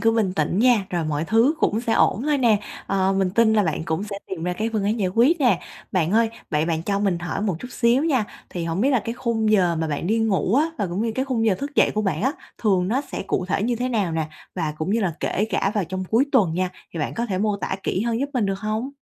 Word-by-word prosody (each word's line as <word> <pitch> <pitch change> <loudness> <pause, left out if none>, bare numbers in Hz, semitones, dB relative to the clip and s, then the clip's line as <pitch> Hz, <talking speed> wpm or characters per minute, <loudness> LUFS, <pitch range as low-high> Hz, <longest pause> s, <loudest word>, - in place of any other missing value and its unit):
cứ 225 - +4
bình 210 -5 +1
tĩnh 160 +5 0
nha, 235 -5 +4
rồi 170 -3 -1
mọi 155 +1 -1
thứ 230 - +3
cũng 215 +2 +2
sẽ 230 -2 -1
ổn 215 - +3
thôi 295 0 +1
nè. 230 -4 +4 0.3
Ờ, 195 0 +1
mình 190 -2 +1
tin 220 +2 +3
là 210 -1 +4
bạn 160 -2 -1
cũng 160 +5 -2
sẽ 200 -1 -6
tìm 175 -3 -5
ra 180 - 0
cái 220 +5 -2
phương 210 -3 0
án 215 +3 0
giải 185 - +1
quyết 255 - +3
nè. 245 -3 +3 0.3
Bạn 180 -1 +1
ơi, 225 0 +3 0.2
vậy 150 0 +1
bạn 165 -1 -1
cho 200 +2 0
mình 195 -4 +1
hỏi 175 +3 -3
một 195 -6 0
chút 250 - -7
xíu 245 +5 +2
nha, 260 -9 +2 0.3
thì 175 -2 -4
hổng 165 +3 -2
biết 270 +4 +3
là 255 - +3
cái 230 - -2
khung 230 -3 0
giờ 180 -5 +3
mà 160 - -1
bạn 150 +3 -2
đi 225 +3 +2
ngủ 215 -1 +1
á 300 +4 +4
và 200 - 0
cũng 180 +5 -2
như 230 -1 -1
cái 260 +2 0
khung 235 -4 0
giờ 200 - +4
thức 280 +7 -6
dậy - - +4
của 215 - 0
bạn 170 -6 -1
á, 265 +3 +2 0.3
thường 190 -4 +2
nó 255 +5 +1
sẽ 280 - -6
cụ 180 - -1
thể 195 - 0
như 240 +1 0
thế 250 +2 -1
nào 205 -8 0
nè 160 -1 -1 0.3
và 160 -4 -2
cũng 155 +5 -2
như 230 - +2
là 185 -5 0
kể 205 - 0
cả 195 - +1
vào 205 -4 +1
trong 185 +2 -4
cuối 230 +8 +2
tuần 190 -11 +3
nha, 185 0 0 0.2
thì 165 - -5
bạn - - -2
có 235 +1 -2
thể 190 -3 -2
mô 210 0 +1
tả 190 - -3
kỹ 185 - -1
hơn 235 +1 -1
giúp 280 - -1
mình 225 -5 +1
được 195 0 -2
hông? 215 +5 -2
205 Hz, 295 wpm, -23 LUFS, 180-230 Hz, 0.3 s, cứ